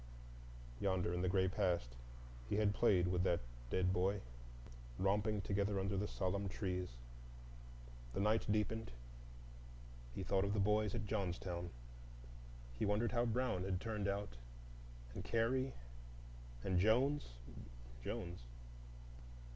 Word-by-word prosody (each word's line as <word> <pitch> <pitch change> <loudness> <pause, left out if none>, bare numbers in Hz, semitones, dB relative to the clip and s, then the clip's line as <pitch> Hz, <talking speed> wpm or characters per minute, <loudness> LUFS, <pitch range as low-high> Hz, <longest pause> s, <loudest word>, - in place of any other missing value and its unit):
Yonder 95 -3 +1
in 90 - 0
the 90 - +2
gray 95 0 +3
past 85 -10 0 0.5
he - - +1
had 105 -1 +3
played 90 -3 +4
with 90 0 +2
that 90 -2 +2 0.3
dead 90 +4 +2
boy, 95 +3 +2 0.8
romping 105 +2 +2
together 100 0 +1
under 100 +1 0
the 100 +2 0
solemn 100 +1 -1
trees. 90 -2 -2 1.2
The - - -2
night 105 +1 +2
deepened; 110 +1 0 1.3
he 95 - -3
thought 95 +1 +2
of 100 +1 0
the - - +1
boys 105 +1 +3
at 110 -2 -2
Johnstown. 90 -4 -2 1.1
He - - +1
wondered 105 +3 +2
how 120 0 +2
Brown 115 -5 +1
had 95 -1 0
turned 105 -2 -2
out, 100 -11 -2 0.8
and - - -5
Carey? 130 +4 +1 0.9
And 90 -1 +2
Jones,—Jones? 60 - -1
100 Hz, 120 wpm, -39 LUFS, 90-105 Hz, 1.3 s, played